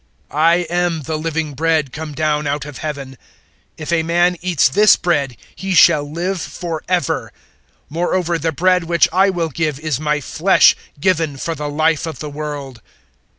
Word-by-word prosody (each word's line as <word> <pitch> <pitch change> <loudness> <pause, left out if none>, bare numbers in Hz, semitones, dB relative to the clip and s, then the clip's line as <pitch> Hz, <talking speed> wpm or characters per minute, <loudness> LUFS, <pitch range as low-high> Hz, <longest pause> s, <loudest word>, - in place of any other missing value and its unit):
006:051 - - -7
I 165 +2 +5 0.2
am 175 -2 0
the 155 +4 -3
living 160 -1 -3
bread 155 -2 0
come 155 -1 -6
down 150 -1 0
out 140 0 -2
of 150 -2 -9
Heaven. 140 -4 -6 0.6
If 155 +2 -4
a 165 - +3
man 175 +2 +2
eats 175 -5 +2
this 210 +11 +5
bread, 140 -8 -1 0.2
he 190 -1 -3
shall 145 -3 +5
live 175 +3 -2
for 165 -3 -5
ever. 180 -6 -1 0.6
Moreover 170 +1 -1
the 160 +2 -1
bread 180 +2 +2
which 170 0 +3
I 190 +2 +4
will 170 -3 -1
give 155 -1 -2
is 155 -4 -2
my 150 -1 0
flesh 170 +6 +4 0.2
given 160 -4 0
for 165 +4 -3
the 150 -1 -5
life 160 +2 +1
of 160 - -6
the 150 -1 -7
world." 145 -5 -6
160 Hz, 175 wpm, -18 LUFS, 150-170 Hz, 0.6 s, I